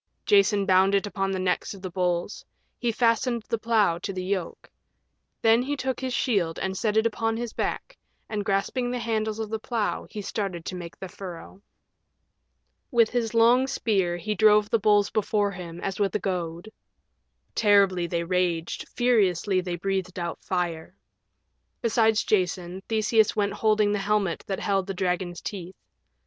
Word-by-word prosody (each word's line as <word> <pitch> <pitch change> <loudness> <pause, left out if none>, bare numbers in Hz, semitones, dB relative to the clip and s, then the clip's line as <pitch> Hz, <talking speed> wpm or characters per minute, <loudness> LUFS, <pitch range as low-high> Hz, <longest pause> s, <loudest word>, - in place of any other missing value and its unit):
Jason 230 - +4
bound 190 +1 +4
it 200 - +1
upon 195 -1 -2
the 190 - -1
necks 185 +2 -1
of 195 - -13
the 185 - -5
bulls. 180 +1 -1 0.4
He 240 -1 0
fastened 230 0 +1
the 230 - 0
plow 215 -7 +2
to 195 - -4
the 185 -1 -4
yoke. 185 -2 -3 0.8
Then 225 +1 +5
he 285 +3 -2
took 260 -1 -2
his 260 -1 -3
shield 195 -10 0
and 190 0 -2
set 215 +2 0
it 220 - +3
upon 225 0 0
his 235 -1 -4
back, - - -3 0.3
and 210 -2 -3
grasping 200 +6 0
the 250 - -2
handles 220 -2 -1
of 220 -1 -4
the 220 - -2
plow 220 -1 -2
he 215 - -7
started 190 -5 -4
to 185 - -4
make 170 -2 -8
the 190 - -7
furrow. 185 +1 -9 1.3
With 230 -2 +3
his 235 -2 -1
long 240 +3 +5
spear 190 -9 0
he 195 +5 -2
drove 210 -1 +4
the 230 - +3
bulls 205 -1 +3
before 205 -1 +1
him 175 -2 -8
as 195 0 -3
with 200 -2 0
a - - +2
goad. 175 +1 -4 0.8
Terribly 200 -4 +3
they 170 0 -1
raged, 175 -2 -1
furiously 200 -6 +2
they 180 -1 -3
breathed 185 0 -3
out 170 -1 -4
fire. 175 -1 -3 0.9
Beside 225 -1 +3
Jason 185 -3 0
Theseus 220 0 +2
went 200 -1 0
holding 215 -1 +2
the 205 - 0
helmet 200 -3 0
that 195 - -3
held 195 -2 0
the 195 - -4
dragon's 180 -1 -2
teeth. 185 -2 -6
200 Hz, 170 wpm, -26 LUFS, 185-220 Hz, 1.3 s, Then